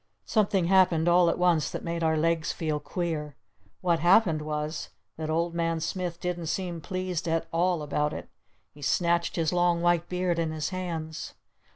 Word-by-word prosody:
Something 200 -4 +2
happened 180 -3 +4
all 175 0 +5
at - - 0
once 175 -4 +2
that - - -6
made 170 0 -3
our 160 -1 +2
legs 165 0 +1
feel 155 -2 -2
queer. 150 -2 -3 0.5
What 170 -2 +2
happened 175 -2 +4
was 150 +1 -3 0.3
that 155 -1 -5
Old 170 +2 0
Man 165 -1 0
Smith 175 +1 -3
didn't 175 -2 -3
seem 175 -1 -3
pleased 185 -1 -3
at 165 0 0
all 175 -1 +1
about 150 0 0
it. - - -6 0.4
He 145 - -16
snatched 170 +4 +1
his 165 -1 0
long 175 -1 +3
white 175 0 +2
beard 180 -1 0
in 165 -1 0
his 155 -1 -3
hands. 165 -4 -5
170 Hz, 175 wpm, -27 LUFS, 160-180 Hz, 0.5 s, all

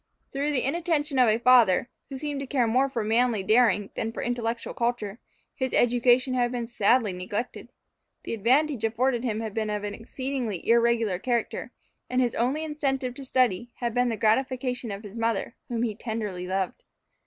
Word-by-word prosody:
Through 285 +2 -1
the 255 - +1
inattention 300 -2 0
of 245 -3 +6
a 215 - +3
father, 240 -4 +5 0.2
who 270 - -6
seemed 290 0 -4
to 275 - -5
care 255 -3 +1
more 255 +4 +2
for 235 -4 -2
manly 225 -1 +2
daring 215 -1 +3
than 225 - -3
for - - -5
intellectual 235 -1 -2
culture, 235 -3 -2 0.3
his 260 -2 -2
education 245 +2 +3
had 245 -1 +1
been 240 -2 -3
sadly 230 -2 +2
neglected. 205 +6 -5 0.5
The - - -4
advantages 255 +4 +2
afforded 240 +2 0
him 225 -3 -1
had 220 -2 -5
been 220 -1 -2
of 210 -1 -2
an 205 -1 -3
exceedingly 245 -4 -4
irregular 230 -5 +3
character, 240 +1 -2 0.4
and 255 - +1
his 245 -2 +2
only 265 +7 0
incentive 275 -5 -2
to 275 - -9
study 245 -4 +1
had 235 -2 -3
been 245 0 +2
the 225 - -2
gratification 250 +2 0
of 200 +1 -6
his 210 +2 -8
mother, 230 -1 -1
whom 240 -2 -2
he 225 -3 -1
tenderly 210 -5 -4
loved. 190 0 -2
240 Hz, 180 wpm, -26 LUFS, 220-255 Hz, 0.5 s, of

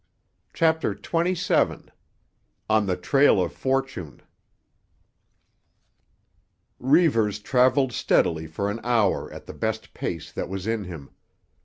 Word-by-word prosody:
CHAPTER 160 0 +2
XXVII—ON 165 - -2
THE 90 -1 0
TRAIL 100 +7 +4
OF 90 -2 -1
FORTUNE 135 - -3 2.6
Reivers 125 - +3
travelled 130 +3 +2
steadily 80 -7 +1
for 100 +6 -2
an 110 - -5
hour 115 -5 +1
at - - -10
the - - -9
best - - -4
pace 85 -2 -5
that - - -5
was 95 0 -5
in 110 -2 -2
him. 80 -6 -9
110 Hz, 105 wpm, -25 LUFS, 90-135 Hz, 2.6 s, TRAIL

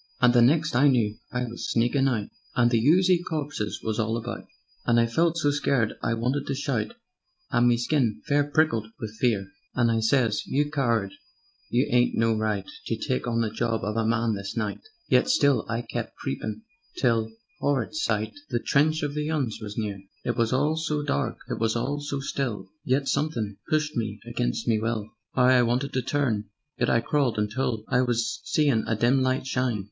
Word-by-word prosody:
"And 125 -1 +5
the 120 - +6
next 150 +5 +3
I 135 +4 +5
knew 115 -6 +2
I 125 0 -1
was 120 -1 -6
sneakin' 120 +4 +2
out, 110 -6 -1 0.3
And 120 -1 +4
the 115 -2 +2
oozy 180 +1 +4
corpses 145 -10 -3
was 110 0 -2
all 110 +1 0
about, 120 +1 -6 0.4
And 120 -1 +3
I 115 - +4
felt 165 +8 +1
so 145 -3 +2
scared 135 -6 +1
I 115 - 0
wanted 125 +5 -1
to 140 - -1
shout, 130 -6 -2 0.6
And 120 +1 +4
me 120 -1 +4
skin 120 -2 +1
fair 145 0 +3
prickled 145 -8 +1
wiv 110 -4 -5
fear; 105 -6 +1 0.3
And 120 -2 +3
I 115 - +2
sez: 115 -2 +2
'You 145 +2 0
coward! 115 -9 +1 0.6
You 125 +3 +2
'ad 120 0 +3
no 115 0 +3
right 105 -3 -1 0.2
To - - 0
take 65 - -2
on 115 -1 +1
the 110 -2 -1
job 115 0 -1
of 105 +1 -2
a 115 - +1
man 115 0 +1
this 100 +2 -5
night,' 105 -2 -2 0.3
Yet - - +3
still 140 - +3
I 115 +1 -1
kept 115 - -5
creepin' 105 +10 -4 0.3
till 115 -3 +2 0.3
('orrid 140 -2 0
sight!) 110 -8 -1 0.2
The 120 - 0
trench 155 +6 +2
of 145 -1 -1
the 150 +1 -2
'Uns 140 -8 -1
was 105 -1 -7
near. 105 -3 -3 0.2
"It 120 - 0
was 115 -1 +1
all 150 +5 +2
so 150 -2 -1
dark, 140 - -1
it - - -3
was 115 0 +1
all 140 +5 -1
so 145 -1 -3
still; 135 -5 -3
Yet 135 +2 +1
somethin' 120 -10 -1
pushed 150 -1 +1
me 110 -3 -2
against - - -2
me 110 -2 +3
will; 110 -1 -2 0.2
'Ow 125 - +4
I 130 -1 +6
wanted 125 +4 0
to 130 - +1
turn! 120 -5 0 0.3
Yet 120 - +2
I 115 - +3
crawled 130 -3 +1
until 110 +1 -1
I 125 - +3
was 120 +7 -1
seein' 140 -8 +2
a 110 - +1
dim 120 +5 +3
light 130 0 0
shine. 130 -4 0
120 Hz, 200 wpm, -26 LUFS, 110-140 Hz, 0.6 s, the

